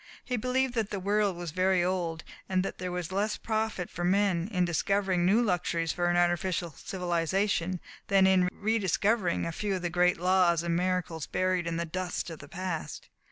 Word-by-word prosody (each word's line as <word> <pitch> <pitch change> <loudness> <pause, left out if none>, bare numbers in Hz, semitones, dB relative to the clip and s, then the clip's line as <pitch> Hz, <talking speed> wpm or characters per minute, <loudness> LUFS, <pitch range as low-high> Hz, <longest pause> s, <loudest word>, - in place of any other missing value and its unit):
He 250 - -1
believed 255 +2 0
that 225 -4 -1
the 200 - -3
world 200 -1 +1
was 175 -2 -5
very 185 +1 +2
old, 175 -3 -1 0.3
and 185 -1 +2
that - - -5
there 180 0 -3
was 180 -1 -4
less 205 +3 0
profit 220 -5 -2
for 175 - -6
men 185 -1 +2
in 180 -3 +2
discovering 185 +1 +1
new 220 +5 +4
luxuries 175 -4 0
for 175 -1 0
an 175 - +2
artificial 175 0 +1
civilization 180 +2 -1 0.3
than 195 -1 +5
in 185 -1 +4
re 220 +4 0
discovering 200 -1 +1
a 165 - -2
few 200 +4 -2
of 185 - -5
the 175 - -1
great 180 +1 +3
laws 180 -2 +3
and 170 -1 0
miracles 180 -3 -1
buried 185 -2 0
in 165 0 -2
the 170 - -1
dust 180 0 -3
of 160 - -8
the 140 - -11
past. 180 -2 -5
185 Hz, 195 wpm, -29 LUFS, 175-195 Hz, 0.3 s, than